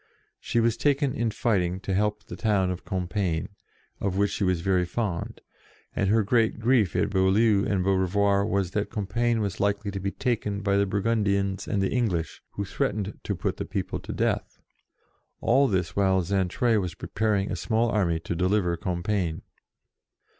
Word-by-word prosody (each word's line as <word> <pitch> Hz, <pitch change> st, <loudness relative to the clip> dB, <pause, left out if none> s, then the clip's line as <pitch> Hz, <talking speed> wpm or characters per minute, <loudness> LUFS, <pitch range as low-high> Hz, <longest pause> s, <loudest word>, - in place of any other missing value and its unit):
She 120 Hz, -, 0 dB
was 115 Hz, -1 st, +2 dB
taken 140 Hz, -2 st, +1 dB
in 120 Hz, -1 st, 0 dB
fighting 95 Hz, -5 st, 0 dB
to 100 Hz, -, -3 dB
help 105 Hz, +2 st, 0 dB
the -, -, -8 dB
town 100 Hz, -4 st, +1 dB
of 90 Hz, -, -5 dB
Compiegne, 90 Hz, -2 st, -2 dB, 0.5 s
of 95 Hz, -1 st, -1 dB
which 100 Hz, 0 st, +2 dB
she -, -, -2 dB
was 90 Hz, -3 st, +1 dB
very 95 Hz, 0 st, +2 dB
fond, 90 Hz, -1 st, -3 dB, 0.5 s
and 95 Hz, -, +1 dB
her 110 Hz, +1 st, +4 dB
great 115 Hz, +1 st, +2 dB
grief 115 Hz, -5 st, +2 dB
at 105 Hz, 0 st, +1 dB
Beaulieu 100 Hz, +2 st, +3 dB
and 95 Hz, -3 st, +1 dB
Beaurevoir 100 Hz, +1 st, +2 dB
was 95 Hz, -3 st, 0 dB
that 105 Hz, +1 st, -1 dB
Compiegne 115 Hz, +3 st, 0 dB
was 100 Hz, -3 st, -3 dB
likely 100 Hz, 0 st, 0 dB
to 100 Hz, -, -4 dB
be 95 Hz, +1 st, -2 dB
taken 105 Hz, -3 st, -2 dB
by 100 Hz, -1 st, +1 dB
the 100 Hz, 0 st, +2 dB
Burgundians 100 Hz, -1 st, 0 dB
and 100 Hz, -1 st, 0 dB
English, 95 Hz, -, -1 dB
who 100 Hz, -, -3 dB
threatened 100 Hz, +1 st, -2 dB
to -, -, -3 dB
put -, -, -2 dB
the -, -, -3 dB
people -, -, -3 dB
to -, -, -7 dB
death. -, -, -1 dB, 0.8 s
All 135 Hz, +4 st, +4 dB
this 90 Hz, -6 st, -1 dB
while 95 Hz, -2 st, +3 dB
Xaintrailles 100 Hz, +5 st, +1 dB
was 90 Hz, -3 st, -4 dB
preparing 100 Hz, -2 st, -1 dB
a -, -, -1 dB
small 115 Hz, +1 st, +1 dB
army 85 Hz, -6 st, +1 dB
to 85 Hz, -, -4 dB
deliver 90 Hz, 0 st, +1 dB
Compiegne. 90 Hz, -1 st, -2 dB
100 Hz, 170 wpm, -26 LUFS, 95-110 Hz, 0.8 s, her